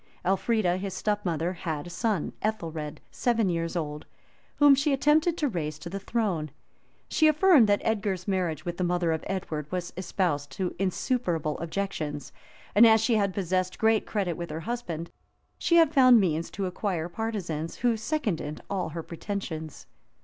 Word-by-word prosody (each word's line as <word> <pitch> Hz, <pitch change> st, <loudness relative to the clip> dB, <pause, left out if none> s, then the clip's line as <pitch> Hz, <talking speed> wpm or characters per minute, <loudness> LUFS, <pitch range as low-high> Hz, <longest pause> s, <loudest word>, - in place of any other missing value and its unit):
Elfrida, 190 Hz, -1 st, +2 dB
his 190 Hz, 0 st, -4 dB
step 210 Hz, +1 st, -1 dB
mother, 170 Hz, 0 st, -1 dB
had 160 Hz, -4 st, -4 dB
a -, -, -8 dB
son, 180 Hz, 0 st, -1 dB
Ethelred, 160 Hz, -8 st, -3 dB
seven 230 Hz, -5 st, +1 dB
years 165 Hz, -1 st, -2 dB
old, 150 Hz, -3 st, -4 dB, 0.5 s
whom 290 Hz, -1 st, +7 dB
she 280 Hz, +1 st, +2 dB
attempted 310 Hz, +5 st, +3 dB
to 295 Hz, -, +1 dB
raise 155 Hz, -, -3 dB
to 170 Hz, +2 st, -8 dB
the 195 Hz, -, -3 dB
throne: 195 Hz, -8 st, -1 dB, 0.6 s
she 315 Hz, -3 st, +3 dB
affirmed 310 Hz, -, +6 dB
that 205 Hz, -, +2 dB
Edgar's 205 Hz, -4 st, -1 dB
marriage 175 Hz, -5 st, -1 dB
with 175 Hz, 0 st, -4 dB
the 180 Hz, -, -1 dB
mother 175 Hz, -1 st, +1 dB
of 160 Hz, -1 st, -2 dB
Edward 155 Hz, -6 st, -4 dB
was 180 Hz, -1 st, -3 dB
exposed 170 Hz, -6 st, -1 dB
to 180 Hz, +4 st, -2 dB
insuperable 185 Hz, -, 0 dB
objections; 160 Hz, -4 st, -4 dB, 0.4 s
and 225 Hz, +3 st, +8 dB
as 220 Hz, 0 st, +6 dB
she 225 Hz, +2 st, +2 dB
had 200 Hz, -3 st, +2 dB
possessed 185 Hz, -1 st, -1 dB
great 220 Hz, -1 st, +2 dB
credit 195 Hz, -5 st, -1 dB
with 170 Hz, -1 st, -6 dB
her 155 Hz, +2 st, -5 dB
husband, 175 Hz, -7 st, -4 dB, 0.5 s
she 340 Hz, -, +2 dB
had 325 Hz, -3 st, +5 dB
found 255 Hz, -4 st, +7 dB
means 165 Hz, -4 st, 0 dB
to 200 Hz, -, -3 dB
acquire 180 Hz, -2 st, -2 dB
partisans, 175 Hz, -5 st, -4 dB
who 240 Hz, -1 st, +1 dB
seconded 220 Hz, -, -2 dB
all 195 Hz, -2 st, -1 dB
her 165 Hz, +1 st, -5 dB
pretensions. 165 Hz, -3 st, -6 dB
185 Hz, 165 wpm, -27 LUFS, 165-220 Hz, 0.6 s, and